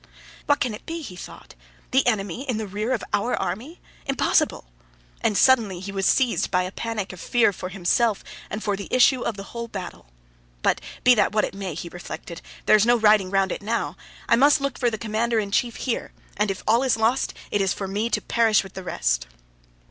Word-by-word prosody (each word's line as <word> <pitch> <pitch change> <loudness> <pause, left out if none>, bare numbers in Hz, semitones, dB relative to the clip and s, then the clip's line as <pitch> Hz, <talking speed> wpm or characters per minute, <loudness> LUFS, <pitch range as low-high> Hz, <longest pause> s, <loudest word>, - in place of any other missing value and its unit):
"What 290 - +3
can 245 -3 -1
it 210 - -10
be?" 330 0 -4
he 185 - -8
thought. - - -11 0.4
"The 265 0 +3
enemy 220 +4 -1
in 240 - 0
the 220 - -3
rear 210 +4 -3
of 250 - 0
our 205 +5 +1
army? 270 - -4 0.3
Impossible!" 270 - +1 0.6
And 210 - +1
suddenly 225 -9 +4
he 195 +2 -6
was 195 -1 0
seized 255 -3 +2
by 180 0 +2
a 185 - -4
panic 215 -3 -4
of 180 - -11
fear 235 -4 +3
for 185 - -6
himself 195 +4 +1 0.3
and 215 - -5
for 205 -2 0
the 200 0 -7
issue 255 0 +4
of 220 - -2
the 195 - -6
whole 235 0 -4
battle. 195 - -8 0.6
"But - - +2 0.2
be 250 - +7
that 215 - +2
what 215 - +3
it - - -7
may," 195 -4 -5
he 170 - -6
reflected, 170 0 -8 0.2
"there - - +6
is 210 - +5
no 240 +1 +4
riding 210 -4 +4
round 195 -1 +1
it - - -4
now. 205 -7 -2 0.3
I - - +5
must 285 +5 +5
look 275 -2 -3
for 245 - +2
the 220 - -4
commander 225 +2 -1
in 205 -2 -1
chief 235 +3 +1
here, 250 - -3 0.2
and 210 0 +1
if 195 - -4
all 230 +3 +4
is 260 -4 +2
lost 225 +4 +1 0.2
it 205 - +1
is 195 -2 +1
for 195 - -3
me 210 +4 -1
to - - 0
perish 225 -3 +3
with 195 - -12
the 190 - -6
rest." - - -1
215 Hz, 220 wpm, -24 LUFS, 195-240 Hz, 0.6 s, be